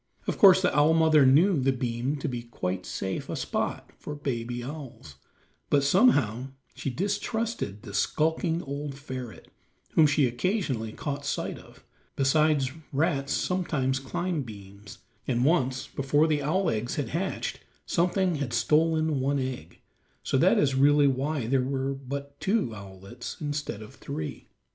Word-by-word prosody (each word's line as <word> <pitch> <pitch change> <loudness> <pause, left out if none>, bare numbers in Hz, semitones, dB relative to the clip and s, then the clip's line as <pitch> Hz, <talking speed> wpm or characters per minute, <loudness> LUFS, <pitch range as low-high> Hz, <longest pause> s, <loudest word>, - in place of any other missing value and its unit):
Of - - -3
course 190 -1 +8
the 180 - +2
owl 150 +2 +5
mother 155 -4 +5
knew 160 +6 +5
the 135 +1 +2
beam 125 +1 -2
to 140 - -4
be 125 -2 -3
quite 95 -6 -4
a - - -7
safe 95 0 -4
spot - - -3
for 150 - -6
baby 120 -4 -3
owls, 130 - -9 0.5
but 140 -1 +3
somehow 140 - +3 0.3
she - - -4
distrusted 205 - -2
the 100 - -9
skulking 160 - 0
old 140 0 -5
ferret, 130 -4 -8 0.4
whom 155 - +5
she 145 -1 +3
occasionally 125 - -1
caught 140 +4 -4
sight - - -3
of; - - -17 0.3
besides, 140 0 +2 0.2
rats 140 -1 0
sometimes 150 -8 0
climb 170 +5 -2
beams, 100 -4 -11 0.3
and 125 0 +1
once, 135 -5 +1
before 140 +3 +2
the 155 -2 +1
owl 165 +5 +1
eggs 115 +2 -2
had 145 - -2
hatched, 190 +4 -3 0.3
something 180 0 +1
had 135 -5 -3
stolen 155 +4 +2
one 140 +2 +1
egg; 130 - -5 0.4
so - - -1
that - - +4
is 140 -2 +3
really 145 +2 +5
why 135 0 0
there 130 +3 +2
were 135 +1 -1
but 140 +1 -7
two 195 - 0
owlets 100 +3 -9
instead 145 -8 -4
of 105 - -12
three. 80 - -6
140 Hz, 150 wpm, -27 LUFS, 125-155 Hz, 0.5 s, course